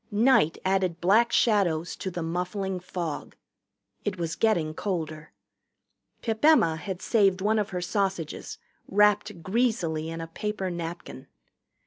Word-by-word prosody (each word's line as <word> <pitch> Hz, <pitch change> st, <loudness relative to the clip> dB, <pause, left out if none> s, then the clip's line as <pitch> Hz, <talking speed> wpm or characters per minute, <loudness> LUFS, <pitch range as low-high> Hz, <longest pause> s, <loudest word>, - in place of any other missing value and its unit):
Night 210 Hz, -, +3 dB
added 185 Hz, -3 st, +1 dB
black 215 Hz, +7 st, +4 dB
shadows 180 Hz, -7 st, +2 dB
to 190 Hz, -, -4 dB
the 175 Hz, -2 st, -4 dB
muffling 180 Hz, +3 st, -2 dB
fog. 175 Hz, -4 st, -5 dB, 0.7 s
It 200 Hz, -3 st, -2 dB
was 165 Hz, -1 st, -3 dB
getting 170 Hz, -9 st, +1 dB
colder. 160 Hz, -4 st, -4 dB, 0.9 s
Pip 220 Hz, 0 st, -2 dB
Emma 265 Hz, -, +5 dB
had 185 Hz, +2 st, -6 dB
saved 195 Hz, -5 st, +3 dB
one 215 Hz, +3 st, +2 dB
of 210 Hz, 0 st, -1 dB
her 180 Hz, -1 st, -3 dB
sausages, 190 Hz, -4 st, -2 dB, 0.3 s
wrapped 210 Hz, -2 st, +2 dB
greasily 185 Hz, -7 st, 0 dB
in 165 Hz, 0 st, -5 dB
a 165 Hz, -, -4 dB
paper 190 Hz, +3 st, -3 dB
napkin. 170 Hz, -, -7 dB
185 Hz, 130 wpm, -27 LUFS, 165-210 Hz, 0.9 s, Emma